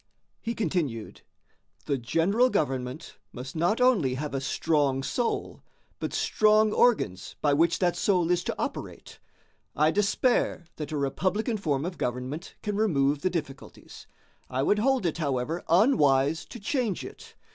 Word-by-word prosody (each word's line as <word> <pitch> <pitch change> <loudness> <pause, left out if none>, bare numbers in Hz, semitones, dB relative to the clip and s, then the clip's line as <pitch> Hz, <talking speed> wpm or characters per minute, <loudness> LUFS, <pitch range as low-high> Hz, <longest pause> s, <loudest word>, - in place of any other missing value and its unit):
He 230 +1 -3
continued: 150 - -2 0.6
"The 140 -2 -1
general 165 - +2
government 130 - -3
must 130 +1 -8
not 175 +8 +1
only 205 - +3
have 145 +2 -4
a 135 - -2
strong 140 -2 0
soul, 240 - -2 0.4
but - - -3
strong 215 0 +3
organs 110 - +1
by 145 -1 +2
which 165 +4 +3
that 175 -2 +1
soul 180 -4 +1
is 175 0 +1
to - - -2
operate. - - -6 0.6
I 155 +1 +3
despair 205 -1 +1
that 150 -1 -5
a 155 - -2
republican 185 - -1
form 150 -7 -1
of 180 0 -5
government 125 +7 -4
can 210 -2 -2
remove 145 -9 +2
the 185 - +1
difficulties; 150 -6 -7 0.4
I 130 +1 -1
would 210 +8 +2
hold 260 -2 +2
it, 170 0 -1
however, 145 +2 -2
unwise 160 - +3
to 240 - -10
change 220 - -1
it. - - -12
165 Hz, 145 wpm, -27 LUFS, 135-210 Hz, 0.6 s, only